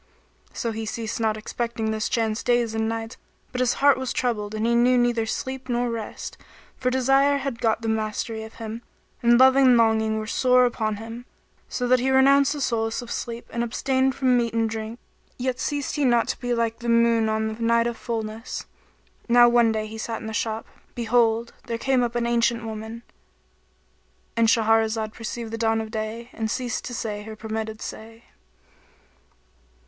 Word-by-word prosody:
So 230 Hz, -, -3 dB
he 220 Hz, 0 st, -5 dB
ceased 225 Hz, 0 st, -4 dB
not 220 Hz, -1 st, +1 dB
expecting 225 Hz, 0 st, -3 dB
this 220 Hz, 0 st, -1 dB
chance 225 Hz, -2 st, 0 dB
days 240 Hz, -2 st, +1 dB
and 220 Hz, 0 st, 0 dB
nights, 225 Hz, 0 st, -4 dB, 0.3 s
but 250 Hz, -, -4 dB
his 250 Hz, -1 st, +3 dB
heart 280 Hz, -2 st, +4 dB
was 260 Hz, -2 st, -3 dB
troubled 215 Hz, -4 st, -1 dB
and 215 Hz, +1 st, -1 dB
he 235 Hz, -, +2 dB
knew 245 Hz, +2 st, +4 dB
neither 240 Hz, -2 st, +1 dB
sleep 260 Hz, +3 st, -4 dB
nor 240 Hz, 0 st, 0 dB
rest; 225 Hz, -2 st, -6 dB, 0.4 s
for 255 Hz, -, 0 dB
desire 270 Hz, +2 st, +3 dB
had 275 Hz, -4 st, -4 dB
got 225 Hz, -1 st, +1 dB
the -, -, -2 dB
mastery 220 Hz, +1 st, -2 dB
of 220 Hz, -, -11 dB
him, 225 Hz, +1 st, -6 dB, 0.4 s
and 235 Hz, 0 st, +5 dB
love 260 Hz, 0 st, +7 dB
and 260 Hz, -3 st, +6 dB
longing 220 Hz, -1 st, +2 dB
were 215 Hz, -, -3 dB
sore 250 Hz, +2 st, +4 dB
upon 220 Hz, -3 st, -1 dB
him, 230 Hz, +3 st, -8 dB, 0.4 s
so 250 Hz, -, -2 dB
that 255 Hz, +1 st, +4 dB
he 260 Hz, +2 st, 0 dB
renounced 275 Hz, +2 st, +5 dB
the 295 Hz, -, -5 dB
solace 230 Hz, -2 st, -1 dB
of 235 Hz, -, -9 dB
sleep 235 Hz, 0 st, -4 dB
and 235 Hz, -, -1 dB
abstained 260 Hz, +3 st, 0 dB
from 255 Hz, -2 st, +3 dB
meat 235 Hz, -1 st, 0 dB
and 225 Hz, -1 st, +1 dB
drink; 220 Hz, +1 st, -5 dB, 0.4 s
yet 255 Hz, 0 st, -2 dB
ceased 290 Hz, 0 st, -2 dB
he 295 Hz, -, +1 dB
not 240 Hz, -3 st, +3 dB
to -, -, -2 dB
be 245 Hz, -1 st, -3 dB
like 230 Hz, -1 st, 0 dB
the 235 Hz, -1 st, -4 dB
moon 230 Hz, -1 st, +3 dB
on 220 Hz, 0 st, 0 dB
the 225 Hz, -, -10 dB
night 230 Hz, 0 st, +3 dB
of 235 Hz, 0 st, -1 dB
fullness. 225 Hz, 0 st, -5 dB, 0.6 s
Now 240 Hz, 0 st, +7 dB
one 235 Hz, -1 st, +4 dB
day 220 Hz, -1 st, -1 dB
as 215 Hz, -, -7 dB
he 220 Hz, -, -7 dB
sat 225 Hz, 0 st, -3 dB
in -, -, -9 dB
the 220 Hz, -, -5 dB
shop, 220 Hz, 0 st, -2 dB, 0.3 s
behold, 235 Hz, -1 st, +1 dB
there 230 Hz, -1 st, -2 dB
came 265 Hz, +1 st, +1 dB
up 240 Hz, -1 st, -1 dB
an 240 Hz, -1 st, 0 dB
ancient 235 Hz, 0 st, +1 dB
woman.—And 60 Hz, -, -7 dB
Shahrazad 220 Hz, -1 st, +2 dB
perceived 230 Hz, 0 st, -6 dB
the 225 Hz, -, -4 dB
dawn 225 Hz, -1 st, +2 dB
of 220 Hz, -1 st, -5 dB
day 225 Hz, +2 st, -4 dB
and 220 Hz, -1 st, -3 dB
ceased 245 Hz, 0 st, -2 dB
to 245 Hz, -, -5 dB
say 210 Hz, -2 st, -3 dB
her 220 Hz, +1 st, -8 dB
permitted 220 Hz, 0 st, -5 dB
say. 225 Hz, +1 st, -9 dB
230 Hz, 190 wpm, -24 LUFS, 220-245 Hz, 0.6 s, love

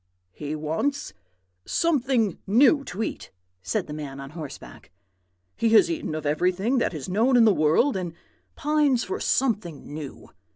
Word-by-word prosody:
"'He 145 Hz, +10 st, -5 dB
wants 160 Hz, -, -2 dB, 0.5 s
something 260 Hz, -, +1 dB
new 270 Hz, +7 st, +5 dB
to 205 Hz, +5 st, -4 dB
eat,' 100 Hz, -, -5 dB, 0.3 s
said 205 Hz, -, -2 dB
the 150 Hz, -, -8 dB
man 145 Hz, -3 st, -6 dB
on 135 Hz, 0 st, -8 dB
horseback. 155 Hz, -4 st, -10 dB, 0.7 s
'He 230 Hz, -, +1 dB
has 225 Hz, -, +6 dB
eaten 315 Hz, -, -3 dB
of 155 Hz, -1 st, -5 dB
everything 185 Hz, -, +1 dB
that 180 Hz, -, -1 dB
is 145 Hz, -, -6 dB
known 230 Hz, +7 st, +3 dB
in 235 Hz, -, +6 dB
the 215 Hz, -, +5 dB
world, 160 Hz, -, +3 dB
and 175 Hz, -3 st, -4 dB, 0.4 s
pines 295 Hz, -4 st, +2 dB
for -, -, -4 dB
something 205 Hz, -, -1 dB
new. 150 Hz, -3 st, -8 dB
190 Hz, 155 wpm, -25 LUFS, 155-255 Hz, 0.7 s, has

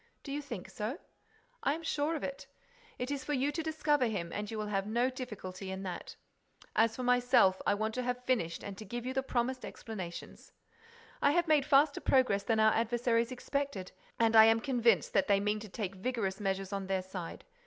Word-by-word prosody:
"Do 280 Hz, -, -7 dB
you 290 Hz, +1 st, -2 dB
think 235 Hz, -11 st, -7 dB
so?" 215 Hz, -, -3 dB, 0.6 s
"I 295 Hz, -, +1 dB
am 330 Hz, -, -8 dB
sure 310 Hz, 0 st, 0 dB
of 305 Hz, -, -4 dB
it. 275 Hz, 0 st, -5 dB, 0.5 s
It 250 Hz, +3 st, -3 dB
is 280 Hz, -2 st, -3 dB
for 295 Hz, -, -2 dB
you 275 Hz, +1 st, +1 dB
to 325 Hz, -, -2 dB
discover 300 Hz, -4 st, +1 dB
him 175 Hz, -6 st, -3 dB
and 210 Hz, 0 st, -3 dB
you 225 Hz, -, -4 dB
will 215 Hz, -, -2 dB
have 200 Hz, -1 st, -1 dB
no 240 Hz, +4 st, +1 dB
difficulty 195 Hz, -7 st, -7 dB
in 190 Hz, +1 st, -5 dB
that. 180 Hz, -2 st, -6 dB, 0.6 s
As 225 Hz, 0 st, +3 dB
for 255 Hz, -, -4 dB
myself, 245 Hz, -6 st, +4 dB
I -, -, +4 dB
want 220 Hz, +1 st, -2 dB
to 255 Hz, -, -2 dB
have 250 Hz, 0 st, -2 dB
finished 195 Hz, -11 st, 0 dB
and 200 Hz, -1 st, -6 dB
to -, -, -6 dB
give 240 Hz, +4 st, -5 dB
you 260 Hz, -, -2 dB
the 265 Hz, -, +1 dB
promised 255 Hz, 0 st, -1 dB
explanations. 185 Hz, -6 st, -8 dB, 0.7 s
I 285 Hz, -, +4 dB
have 345 Hz, 0 st, +2 dB
made 300 Hz, -3 st, +3 dB
faster 285 Hz, 0 st, +4 dB
progress 255 Hz, -7 st, +3 dB
than 220 Hz, +2 st, +1 dB
our 220 Hz, 0 st, +5 dB
adversaries 235 Hz, +1 st, +1 dB
expected 265 Hz, -6 st, -3 dB, 0.3 s
and 225 Hz, -1 st, +3 dB
I 220 Hz, 0 st, +10 dB
am 225 Hz, 0 st, +5 dB
convinced 235 Hz, -, +2 dB
that 195 Hz, -, +3 dB
they 200 Hz, -1 st, +4 dB
mean 210 Hz, +1 st, 0 dB
to 215 Hz, 0 st, -9 dB
take 195 Hz, -1 st, -4 dB
vigorous 195 Hz, -1 st, -2 dB
measures 195 Hz, -1 st, -2 dB
on 195 Hz, -1 st, -3 dB
their 190 Hz, -1 st, 0 dB
side. 185 Hz, -2 st, -7 dB
230 Hz, 210 wpm, -32 LUFS, 200-260 Hz, 0.7 s, I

